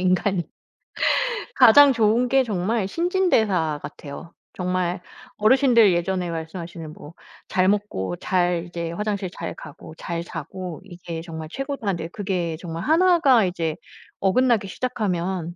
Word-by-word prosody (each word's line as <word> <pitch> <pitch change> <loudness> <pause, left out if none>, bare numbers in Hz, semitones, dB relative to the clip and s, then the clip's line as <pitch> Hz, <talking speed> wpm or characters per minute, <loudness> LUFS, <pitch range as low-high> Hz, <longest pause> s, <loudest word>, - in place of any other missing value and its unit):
인간이. 185 0 +1 1.1
가장 280 +5 +8
좋은 230 +1 +2
게 270 -1 +4
정말 205 -1 -1
신진대사 220 - +1
같아요. 150 +3 -9 0.2
정말 180 0 -1 0.4
어르신들 235 -2 +5
예전에 175 0 -1
말씀하시는 165 -1 -6
뭐 150 +1 -12 0.3
"잘 185 0 +2
먹고 195 - -1
잘 175 -2 0
이제 170 -1 -5
화장실 200 -1 -3
잘 165 - -6
가고 155 +1 -11
잘 170 0 -4
자고 170 +2 -7
이게 175 -3 -8
정말 160 -2 -7
최고다." 270 -3 -5
하는데 170 -4 -1
그게 180 -5 -2
정말 165 -1 -6
1 350 +3 +4
가 260 - +5
이제 165 -3 -2 0.4
어긋나기 215 +1 +2
시작하면 185 -6 -3
185 Hz, 280 characters per minute, -23 LUFS, 170-220 Hz, 1.1 s, 가장